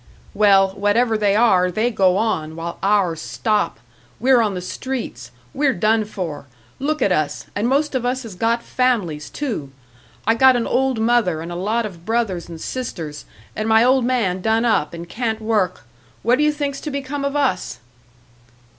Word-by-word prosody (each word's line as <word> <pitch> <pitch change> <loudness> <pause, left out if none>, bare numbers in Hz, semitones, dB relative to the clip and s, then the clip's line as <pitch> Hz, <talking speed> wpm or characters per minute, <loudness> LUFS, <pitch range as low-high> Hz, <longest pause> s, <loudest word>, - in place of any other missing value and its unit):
"Well, 195 -2 +5
whatever 205 +4 +1
they 205 -2 +2
are, 190 -5 +4
they 220 +7 0
go 190 -4 +3
on, 160 -9 -1
while 170 +1 -6
ours 195 -5 +1
stop. 125 - -1 0.4
We're 250 +1 +4
on 210 -4 0
the - - -3
streets, 255 +7 -5 0.2
we're 280 -1 +1
done 215 +4 +2
for. 165 -9 -6 0.3
Look 305 +1 0
at 195 - +2
us 155 -4 -1
and 210 +3 0
most 285 +3 +1
of 260 -2 -1
us 255 +1 -1
has 225 -4 -8
got 230 +5 0
families, 200 -13 0
too! 225 - -4 0.6
I 225 - +4
got 260 +2 +5
an 235 -1 0
old 265 -1 +1
mother 220 -8 +2
an' 165 +2 -6
a - - -5
lot 215 +6 -1
of 175 -5 -9
brothers 215 -5 -1
and 165 -1 -8
sisters, 165 -11 -5 0.3
an' 215 +1 -2
my 220 +1 +5
old 255 +1 +4
man 225 -8 0
done 225 +3 +1
up 195 -8 +1
an' 170 0 -7
can't 220 +3 -3
work. 215 -5 -1 0.4
What 240 +5 +3
do - - +3
you 300 - +4
think's 285 -2 -3
to 305 - -4
become 280 0 -4
of 280 0 -2
us?" 255 - 0
220 Hz, 180 wpm, -20 LUFS, 180-250 Hz, 0.6 s, Well